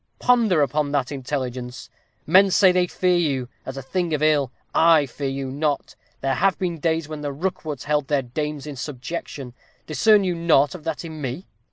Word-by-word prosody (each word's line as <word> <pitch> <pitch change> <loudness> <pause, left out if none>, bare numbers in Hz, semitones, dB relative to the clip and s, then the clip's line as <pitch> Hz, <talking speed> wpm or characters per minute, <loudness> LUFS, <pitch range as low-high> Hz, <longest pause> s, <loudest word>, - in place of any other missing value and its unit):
Ponder 225 -11 +3
upon 145 +1 0
that 135 -2 0
intelligence. 125 -2 -4 0.4
Men 190 +5 +6
say 190 0 +5
they 180 0 +2
fear 180 0 +1
you, 135 -7 0 0.2
as 130 +1 -5
a 135 - -5
thing 170 +3 -1
of 150 - -2
ill. 145 -4 +3 0.2
I 165 -3 +5
fear 135 +2 -4
you 135 -1 -4
not. 145 +1 -2 0.3
There 135 0 0
have 195 +8 +2
been 175 -3 -3
days 160 -1 0
when 155 -1 -7
the 145 -1 -3
Rookwoods 155 -2 -4
held 150 -1 0
their 145 -2 +1
dames 150 +3 -4
in 150 -2 -6
subjection. 135 -1 -6 0.3
Discern 210 +6 +4
you 180 -2 0
nought 165 -4 +3
of 170 -4 -10
that 160 0 -3
in 160 -2 -8
me?" 135 +7 -4
150 Hz, 190 wpm, -23 LUFS, 135-170 Hz, 0.4 s, Men